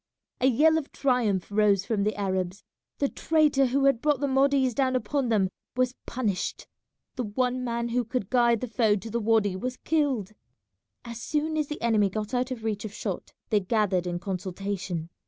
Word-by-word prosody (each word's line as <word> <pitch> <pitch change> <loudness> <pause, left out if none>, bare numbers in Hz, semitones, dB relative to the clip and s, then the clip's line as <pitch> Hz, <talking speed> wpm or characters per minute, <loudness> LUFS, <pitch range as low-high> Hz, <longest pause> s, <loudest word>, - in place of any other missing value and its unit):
A 255 - +3
yell 315 +6 +4
of 290 - -10
triumph 230 -9 0
rose 205 -2 +3
from 215 -2 0
the 210 +2 0
Arabs. 190 -1 -2 0.3
The 280 - +1
traitor 300 -3 +2
who 275 +2 +1
had 275 -4 +3
brought 295 -2 +2
the 285 - 0
Mahdists 270 -1 +3
down 260 +1 +1
upon 265 0 0
them 195 -4 +2 0.3
was 255 0 +2
punished; 210 -8 -2 0.5
the 250 - -1
one 250 +4 -1
man 235 -1 -2
who 245 +1 +1
could 235 -3 -3
guide 235 -3 +3
the 250 - -2
foe 225 -3 +2
to 220 +2 -6
the 235 - 0
wady 215 -3 +2
was 250 +6 -4
killed. 275 - 0 0.7
As 235 -1 -7
soon 310 +3 -1
as 305 -2 0
the 300 - -5
enemy 215 -4 +3
got 215 +4 -4
out 250 0 0
of 245 -4 -5
reach 215 -2 -2
of 215 - -5
shot - - -5 0.2
they 210 - +4
gathered 190 -3 +1
in 175 0 -2
consultation. 185 -2 -4
235 Hz, 190 wpm, -27 LUFS, 205-260 Hz, 0.7 s, yell